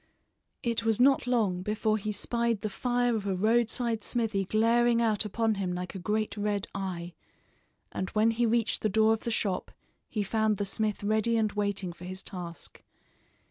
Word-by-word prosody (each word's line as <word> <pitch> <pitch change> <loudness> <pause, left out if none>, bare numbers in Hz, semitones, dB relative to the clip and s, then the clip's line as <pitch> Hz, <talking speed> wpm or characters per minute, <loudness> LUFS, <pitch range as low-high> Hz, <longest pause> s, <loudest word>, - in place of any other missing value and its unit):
It 235 -2 0
was 225 -1 +1
not 265 0 +4
long 210 -8 +1
before 215 +2 0
he 210 +1 -3
spied 235 +1 0
the 215 - -2
fire 245 +3 0
of 205 -2 -3
a 195 - 0
roadside 225 +2 +1
smithy 220 -5 0
glaring 230 +3 +3
out 220 -2 +2
upon 225 +2 0
him 180 -2 -1
like 180 +1 -5
a 195 - -6
great 210 +4 -1
red 205 -1 -1
eye, 180 -3 -4 0.8
and 185 - -3
when 220 +2 +3
he 235 +1 +1
reached 230 0 +1
the 215 - +1
door 220 +2 +4
of 225 - -4
the - - 0
shop 200 -5 -1 0.4
he 210 -2 -1
found 215 +1 +1
the 205 - -1
smith 210 +1 -2
ready 220 +2 +1
and 215 -2 +1
waiting 200 -3 -2
for 175 - -11
his 185 +1 -5
task. 175 -3 -7
215 Hz, 180 wpm, -29 LUFS, 195-230 Hz, 0.8 s, not